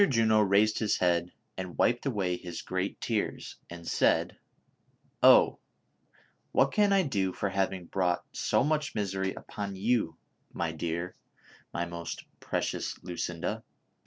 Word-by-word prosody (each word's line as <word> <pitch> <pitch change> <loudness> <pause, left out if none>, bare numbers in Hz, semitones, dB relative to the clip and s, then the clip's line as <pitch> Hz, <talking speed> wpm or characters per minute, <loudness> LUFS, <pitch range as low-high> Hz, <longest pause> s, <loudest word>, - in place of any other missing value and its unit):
JUNO 110 -3 +4
raised 105 +2 +3
his 110 -2 +1
head 85 -1 +1 0.2
and 90 -2 -6
wiped 120 +4 +2
away 100 -8 0
his 90 -1 -7
great 95 +1 -2
tears, 110 -3 -2
and 85 -1 -9
said: - - +2 0.5
'' - - -40
Oh! - - +7 1.0
wliat 135 0 +4
can 205 -1 +4
I 195 -1 +5
do 100 - 0
for 100 - -2
having 95 -1 -1
brought 90 -1 0
so - - +2
much 150 0 0
misery 95 -2 -1
upon 100 -2 -6
you, 105 -3 0 0.3
my 85 -2 -2
dear, 85 +3 -3 0.6
my 85 - -2
most 85 -1 -6
pre - - -1
cious - - -3
Lucinda 85 -1 -3
95 Hz, 140 wpm, -29 LUFS, 90-110 Hz, 1.0 s, Oh